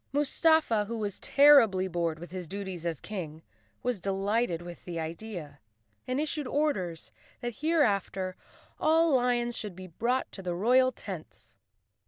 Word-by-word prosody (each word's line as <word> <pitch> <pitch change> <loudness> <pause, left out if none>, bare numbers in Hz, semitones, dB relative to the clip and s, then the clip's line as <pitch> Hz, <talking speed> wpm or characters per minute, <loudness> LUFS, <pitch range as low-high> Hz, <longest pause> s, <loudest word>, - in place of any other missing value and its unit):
Mustafa, 290 -5 +3
who 230 +2 -4
was 205 -3 -3
terribly 245 -10 +6
bored 170 -3 -1
with 175 +2 -10
his 180 -2 -5
duties 190 -2 -5
as 165 -3 -2
King, 165 -6 -6 0.4
was 245 -4 -1
delighted 195 -1 0
with 175 0 -10
the 170 -2 -5
idea 165 -3 -6 0.5
and 255 +2 -1
issued 300 -2 -2
orders 185 - -1 0.3
that 240 -2 -4
hereafter 205 - +1 0.4
all 320 -1 +4
lions 240 -1 +1
should 210 -4 -5
be 185 +1 -9
brought 235 +9 -1
to 195 - -8
the 180 -2 -3
royal 255 +7 +4
tents. 190 -9 -9
205 Hz, 145 wpm, -29 LUFS, 175-255 Hz, 0.5 s, terribly